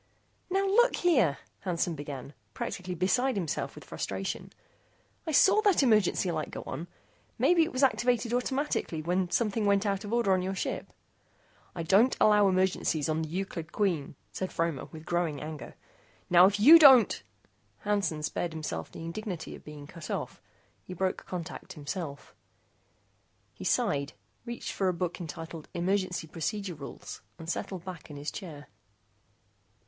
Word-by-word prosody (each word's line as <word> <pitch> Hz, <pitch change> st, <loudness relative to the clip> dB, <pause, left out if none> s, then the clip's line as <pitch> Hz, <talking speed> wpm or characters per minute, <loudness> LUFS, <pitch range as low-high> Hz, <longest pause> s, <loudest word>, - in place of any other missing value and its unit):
"Now 390 Hz, +2 st, +1 dB
look 475 Hz, +6 st, +4 dB
here," 250 Hz, -, +3 dB, 0.2 s
Hansen 175 Hz, -2 st, -1 dB
began, 145 Hz, -2 st, -7 dB, 0.2 s
practically 180 Hz, -1 st, -4 dB
beside 195 Hz, +10 st, +1 dB
himself 170 Hz, -7 st, -2 dB
with -, -, -10 dB
frustration, -, -, -4 dB, 0.8 s
"I -, -, 0 dB
saw 385 Hz, +8 st, +6 dB
that 400 Hz, -8 st, +4 dB
emergency 210 Hz, -6 st, +3 dB
light 155 Hz, -2 st, -3 dB
go -, -, -7 dB
on. 160 Hz, +6 st, -5 dB, 0.5 s
Maybe 350 Hz, -1 st, +4 dB
it 320 Hz, -, +1 dB
was 255 Hz, +2 st, 0 dB
activated 245 Hz, -2 st, +2 dB
automatically 250 Hz, -, -1 dB
when 180 Hz, +2 st, 0 dB
something 220 Hz, +1 st, 0 dB
went 200 Hz, +1 st, +3 dB
out 200 Hz, 0 st, 0 dB
of 205 Hz, -, -6 dB
order 235 Hz, -5 st, +3 dB
on 185 Hz, -, +2 dB
your 190 Hz, +1 st, -2 dB
ship." -, -, -3 dB, 0.8 s
"I 170 Hz, -, -3 dB
don't 200 Hz, +9 st, +4 dB
allow 210 Hz, -1 st, +5 dB
emergencies 185 Hz, -5 st, +1 dB
on 155 Hz, +1 st, 0 dB
the 160 Hz, -, -4 dB
Euclid 175 Hz, -2 st, -4 dB
Queen," 175 Hz, -10 st, -1 dB, 0.2 s
said 185 Hz, -, -4 dB
Fromer 165 Hz, -5 st, -1 dB
with 160 Hz, -1 st, -11 dB
growing 170 Hz, -5 st, -1 dB
anger. 155 Hz, -1 st, -7 dB, 0.6 s
"Now, 180 Hz, +1 st, +8 dB
if 200 Hz, +1 st, 0 dB
you 305 Hz, +10 st, +10 dB
don't 265 Hz, -7 st, +7 dB, 0.3 s
" -, -, -40 dB
Hansen 195 Hz, -7 st, 0 dB
spared 165 Hz, +2 st, -2 dB
himself 155 Hz, -, -5 dB
the 165 Hz, -, -8 dB
indignity 180 Hz, 0 st, -5 dB
of -, -, -11 dB
being 150 Hz, -1 st, -10 dB
cut 160 Hz, +1 st, -10 dB
off. -, -, -4 dB, 0.4 s
He 185 Hz, -, -9 dB
broke 185 Hz, +1 st, -2 dB
contact 180 Hz, +1 st, -6 dB
himself. 150 Hz, -1 st, -6 dB, 1.2 s
He -, -, -10 dB
sighed, 140 Hz, 0 st, +1 dB, 0.3 s
reached 235 Hz, 0 st, -4 dB
for 195 Hz, -, 0 dB
a 185 Hz, -, +2 dB
book 180 Hz, 0 st, -3 dB
entitled 165 Hz, 0 st, -7 dB
Emergency 185 Hz, -1 st, 0 dB
Procedure 185 Hz, +4 st, -3 dB
Rules, 145 Hz, -3 st, -9 dB, 0.2 s
and 165 Hz, -, -10 dB
settled 180 Hz, 0 st, -4 dB
back 185 Hz, -3 st, -8 dB
in 145 Hz, -, -8 dB
his 145 Hz, +2 st, -4 dB
chair. 155 Hz, -7 st, -8 dB
185 Hz, 155 wpm, -29 LUFS, 160-210 Hz, 1.2 s, you